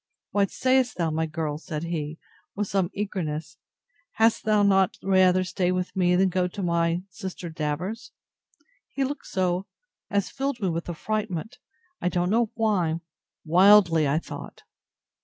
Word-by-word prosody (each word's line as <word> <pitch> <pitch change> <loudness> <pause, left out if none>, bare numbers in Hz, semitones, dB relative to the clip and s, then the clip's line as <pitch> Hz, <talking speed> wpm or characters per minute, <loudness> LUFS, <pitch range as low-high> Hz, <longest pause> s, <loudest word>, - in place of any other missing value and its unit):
What 200 -1 +2
say'st 255 -2 +1
thou, 165 -3 0
my 160 +1 0
girl? 155 -2 -3
said 155 -2 -5
he, 160 -2 -3 0.4
with 205 0 -1
some 190 -3 0
eagerness; 165 -6 -4 0.6
had'st 225 0 +2
thou 210 -1 +3
not 195 -2 +3
rather 185 -1 +4
stay 180 -1 0
with 185 0 -2
me, 180 -1 +3
than 190 +1 +3
go 180 0 +1
to 195 +2 -6
my 170 0 +1
sister 180 -2 -7
Davers? 160 - -4 0.8
He 275 - -2
looked 285 +2 -4
so, 185 0 -1 0.4
as 200 -1 0
filled 270 -1 -2
me 195 -4 0
with 165 0 -3
affrightment; 210 +3 -3 0.4
I 180 - +1
don't 180 +1 0
know 230 0 +2
how; 180 -8 +1 0.4
wildly, 175 -2 +6
I 140 +2 +2
thought. 165 - -7
185 Hz, 150 wpm, -26 LUFS, 165-205 Hz, 0.8 s, wildly